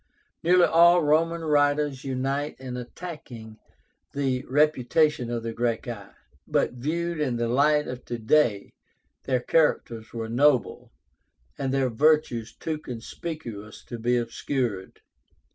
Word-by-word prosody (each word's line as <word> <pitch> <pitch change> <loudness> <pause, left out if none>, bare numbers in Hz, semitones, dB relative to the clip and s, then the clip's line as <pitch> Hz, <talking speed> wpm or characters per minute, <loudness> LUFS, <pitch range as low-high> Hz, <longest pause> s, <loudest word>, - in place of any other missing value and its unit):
Nearly 180 +2 +5
all 170 +1 +5
Roman 165 +3 +2
writers 145 -2 +1
unite 135 +2 -2
in 130 -1 -6
attacking 120 -5 -9 0.5
the 135 -2 -1
reputation 150 -1 +2
of 120 -1 -3
the 115 0 -4
Gracchi; 115 -2 -3 0.4
but - - +1
viewed 165 +6 -3
in 135 -5 0
the 120 0 -1
light 150 +5 +3
of 125 0 -6
to 120 - -4
day 115 -3 +1 0.5
their 130 -2 +1
characters 120 -7 0
were 115 -1 -5
noble, 130 +3 +1 0.6
and 135 - -2
their 135 -2 +1
virtues 125 -3 +2
too 155 -2 -4
conspicuous 120 -4 -8
to 120 - -7
be 120 +2 +1
obscured. 115 -3 -3
130 Hz, 125 wpm, -26 LUFS, 120-150 Hz, 0.6 s, Nearly